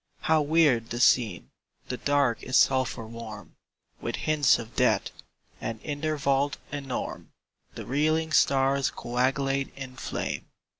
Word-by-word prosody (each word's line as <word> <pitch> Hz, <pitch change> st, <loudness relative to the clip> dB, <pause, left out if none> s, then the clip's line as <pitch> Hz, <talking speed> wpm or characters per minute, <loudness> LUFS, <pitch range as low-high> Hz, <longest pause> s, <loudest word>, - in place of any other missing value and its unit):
How 160 Hz, -1 st, +3 dB
weird 145 Hz, -6 st, +3 dB
the 120 Hz, -, -4 dB
scene! 115 Hz, -7 st, +2 dB, 0.4 s
The 125 Hz, -, -3 dB
Dark 140 Hz, -4 st, +1 dB
is 130 Hz, -, +1 dB
sulphur 130 Hz, -3 st, +2 dB
warm 110 Hz, -3 st, -9 dB, 0.5 s
With -, -, -3 dB
hints 150 Hz, -4 st, +3 dB
of 115 Hz, -1 st, -9 dB
death; -, -, +2 dB, 0.5 s
and 115 Hz, -1 st, -4 dB
in 145 Hz, -2 st, -4 dB
their 155 Hz, -1 st, -1 dB
vault 140 Hz, 0 st, +1 dB
enorme 140 Hz, -3 st, -5 dB, 0.5 s
The -, -, -7 dB
reeling 155 Hz, +4 st, +1 dB
stars 135 Hz, -2 st, +3 dB
coagulate 135 Hz, +3 st, -1 dB
in 130 Hz, -2 st, -8 dB
flame. -, -, -4 dB
135 Hz, 135 wpm, -27 LUFS, 120-145 Hz, 0.5 s, How